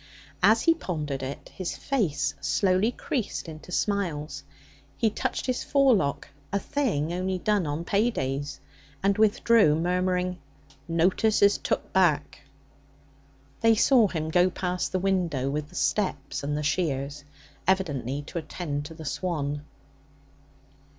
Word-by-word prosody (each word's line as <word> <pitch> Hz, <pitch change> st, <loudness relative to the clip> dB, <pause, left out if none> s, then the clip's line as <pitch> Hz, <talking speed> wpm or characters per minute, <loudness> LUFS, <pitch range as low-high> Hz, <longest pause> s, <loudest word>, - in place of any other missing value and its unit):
As 225 Hz, +1 st, +5 dB
he 330 Hz, -, +6 dB
pondered 150 Hz, -, -4 dB
it, 135 Hz, +1 st, -6 dB
his 185 Hz, -2 st, -4 dB
face 195 Hz, -, 0 dB
slowly 185 Hz, -, +2 dB
creased 240 Hz, -7 st, -3 dB
into 160 Hz, +2 st, -10 dB
smiles. 165 Hz, -8 st, -1 dB, 0.5 s
He 225 Hz, -, +2 dB
touched 260 Hz, +3 st, -2 dB
his 255 Hz, -1 st, -1 dB
forelock 245 Hz, -, +2 dB, 0.2 s
a 200 Hz, -, +1 dB
thing 200 Hz, -, -1 dB
only 185 Hz, +1 st, -1 dB
done 200 Hz, -2 st, +1 dB
on 150 Hz, +4 st, -3 dB
pay 215 Hz, +4 st, +2 dB
days 140 Hz, -, -3 dB, 0.4 s
and 200 Hz, 0 st, +3 dB
withdrew, 215 Hz, -5 st, +4 dB
murmuring, 180 Hz, +1 st, 0 dB, 0.5 s
'Notice 185 Hz, +6 st, +2 dB
is 200 Hz, 0 st, +5 dB
took -, -, -2 dB
back.' 155 Hz, -6 st, +2 dB, 1.2 s
They 225 Hz, 0 st, +5 dB
saw 230 Hz, 0 st, +5 dB
him 160 Hz, -4 st, -3 dB
go 180 Hz, +2 st, +4 dB
past 180 Hz, 0 st, -2 dB
the 185 Hz, -, +1 dB
window 175 Hz, -8 st, 0 dB
with 150 Hz, 0 st, -3 dB
the -, -, -15 dB
steps 140 Hz, 0 st, -1 dB
and 145 Hz, +1 st, -1 dB
the 150 Hz, -, -2 dB
shears, 145 Hz, -2 st, -1 dB, 0.4 s
evidently 145 Hz, -8 st, 0 dB
to 170 Hz, -, -5 dB
attend 150 Hz, -2 st, -4 dB
to 160 Hz, +2 st, -9 dB
the 160 Hz, -1 st, -9 dB
swan. 145 Hz, -1 st, -2 dB
175 Hz, 135 wpm, -27 LUFS, 145-200 Hz, 1.2 s, he